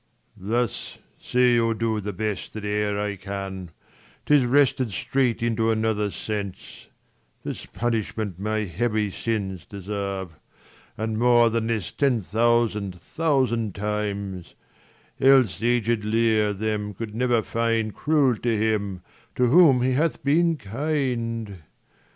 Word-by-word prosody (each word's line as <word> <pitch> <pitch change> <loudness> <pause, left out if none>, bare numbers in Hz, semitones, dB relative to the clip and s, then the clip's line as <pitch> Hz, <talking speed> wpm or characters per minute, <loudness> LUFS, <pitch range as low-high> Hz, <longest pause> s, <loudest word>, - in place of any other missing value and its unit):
Leir. 95 - -9
Thus, 120 - -5 0.2
say 125 -1 +3
or 115 0 +1
do 110 -1 -1
the 105 +1 -4
best 105 -2 -4
that 110 -1 -6
e'er 105 0 0
I 105 -1 -2
can, 95 -1 -6 0.6
'Tis 145 -4 +4
wrested 130 -1 +3
straight 120 +7 0
into 115 -1 +1
another 110 -2 +1
sense: 100 +1 -6 0.6
This - - -6
punishment 110 -5 -2
my 110 +2 -1
heavy 105 +2 -1
sins 100 -4 -3
deserve, 100 -4 -5 0.6
And 110 0 -2
more 120 -1 +5
than 115 0 -1
this 110 -6 -2
ten 135 -5 +1
thousand 110 -3 +1
thousand 125 - 0
times: 100 -3 -3 0.6
40 135 - +6
Else 130 -8 +3
aged 120 -2 +1
Leir 110 -1 +2
them 105 0 -3
could 110 +1 -6
never 120 -1 +1
find 115 -1 0
Cruel 145 -5 +2
to 115 -1 0
him, 100 -4 -1 0.3
to 125 - +3
whom 140 -5 +6
he 130 - +2
hath 150 +5 0
been 165 +3 +3
.kind. 115 -4 -2
110 Hz, 130 wpm, -24 LUFS, 105-120 Hz, 0.6 s, 40